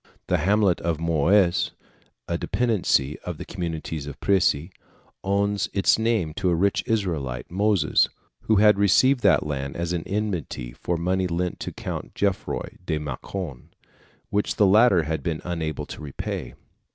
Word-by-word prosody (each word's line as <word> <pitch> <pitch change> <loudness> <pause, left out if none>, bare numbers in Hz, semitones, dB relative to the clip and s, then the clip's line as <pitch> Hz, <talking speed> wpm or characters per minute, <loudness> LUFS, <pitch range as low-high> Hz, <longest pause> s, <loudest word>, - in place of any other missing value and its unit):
The - - +1
hamlet 100 +2 +2
of 85 -2 -1
Mouys, 85 +3 +2 0.5
a - - -1
dependency 100 - +1
of - - -6
the - - -7
communes 80 -4 -4
of 70 - -8
Prissey, 95 -4 +2 0.5
owes 100 +1 0
its 100 +2 +3
name 110 -9 0
to 95 -3 +1
a 85 - +2
rich 100 +4 +1
Israelite, 80 - -2
Moses, 100 +1 +2 0.4
who 110 - +3
had 105 0 +5
received 130 +7 +4
that 90 -9 +4
land 70 -2 -3
as 85 0 -2
an 85 - -1
indemnity 95 - -3
for 85 - -2
money 90 +2 0
lent 90 +1 -2
to - - -4
the - - -13
Count - - -6
Gerfroy 100 -2 -2
de 80 -3 -1
Mâcon, 75 0 -6 0.7
which 105 +1 0
the 105 - +4
latter 100 -3 +5
had 80 -1 -2
been 80 +2 -2
unable 80 -4 -3
to - - -9
repay. 70 -3 -5
90 Hz, 155 wpm, -24 LUFS, 80-100 Hz, 0.7 s, had